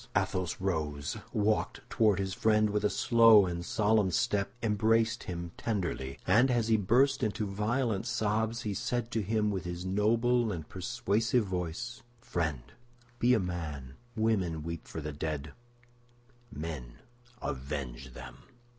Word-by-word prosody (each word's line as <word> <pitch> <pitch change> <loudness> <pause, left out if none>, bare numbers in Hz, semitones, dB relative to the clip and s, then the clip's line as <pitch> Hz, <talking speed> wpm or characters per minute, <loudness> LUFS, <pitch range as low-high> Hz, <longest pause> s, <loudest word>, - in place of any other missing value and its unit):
Athos 95 -2 -1
rose, 75 -6 -2 0.2
walked 105 0 0
toward 105 -4 +3
his 95 -1 -2
friend 110 0 +3
with 105 0 0
a 105 - +3
slow 115 -4 +6
and 85 -1 -3
solemn 105 +1 +2
step, 100 0 0
embraced 115 +2 +2
him 85 -1 -5
tenderly, 85 - -2
and 115 +8 +5
as 120 -3 +1
he 110 - +5
burst 130 +7 +3
into 110 -2 -1
violent 110 +2 -1
sobs, 110 0 0
he 105 - -2
said 120 +4 -2
to 110 - 0
him 105 +1 +1
with 95 -2 -3
his 90 +1 -5
noble 115 +4 +2
and 80 -5 -5
persuasive 115 +3 0
voice, 95 +6 -4 0.2
"Friend, 85 - -2 0.6
be 125 +1 +5
a - - +2
man! 80 -8 -4 0.2
Women 95 -9 0
weep 85 0 -6
for 80 - -6
the 75 0 -5
dead; 75 -1 -4 1.0
men 75 -6 -6 0.4
avenge 65 -2 -5
them!" 65 -1 -9
100 Hz, 140 wpm, -31 LUFS, 85-115 Hz, 1.0 s, slow